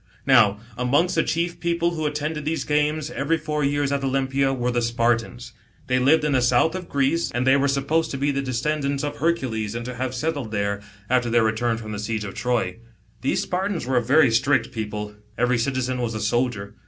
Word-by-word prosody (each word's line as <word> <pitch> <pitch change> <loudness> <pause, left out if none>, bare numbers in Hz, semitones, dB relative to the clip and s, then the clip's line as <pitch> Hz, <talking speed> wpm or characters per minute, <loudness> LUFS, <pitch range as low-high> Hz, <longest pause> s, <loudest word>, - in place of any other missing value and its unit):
Now, 110 -7 +5 0.2
amongst 145 +9 +2
the 165 - +3
cfcief 170 +1 -1
people 170 0 0
who 155 -3 -2
attended 150 +1 -3
these 160 +2 -1
games, 150 +1 0
every 165 0 0
four 150 -1 -2
years 145 0 +1
at 140 -1 -1
Olympia, 135 0 +1
were 125 -2 -1
the 120 0 0
Spartans. 120 +1 -1 0.3
They 125 0 +1
lived 145 +5 +4
in 150 - +1
the 130 -2 +3
south 125 +6 +3
of 185 -2 -6
Greece, 140 +4 +1
and 120 +1 -1
they 130 +1 +5
were 140 0 +2
supposed 140 +4 +1
to 135 - -4
be 140 +2 +1
the 140 0 -1
descendants 140 +2 -1
of 145 0 -3
Hercules, 120 -10 -1
and 120 0 -4
to 125 - -5
have 130 +1 -3
settled 145 -3 -2
there, 100 -1 -2 0.3
after 125 0 +1
their 115 0 +3
return 110 +1 0
from 110 -1 -7
the 105 - -4
siege 110 0 -2
of 100 - -6
Troy. 120 -7 -1 0.4
These 130 - 0
Spartans 185 -4 -2
were 130 0 0
a - - +4
very 135 +2 +4
strict 120 +1 +2
people, 105 -1 -5 0.2
every 125 0 +2
citizen 130 0 -1
was 115 -2 -2
a - - -2
soldier. 110 -2 -1
130 Hz, 210 wpm, -23 LUFS, 120-150 Hz, 0.4 s, Now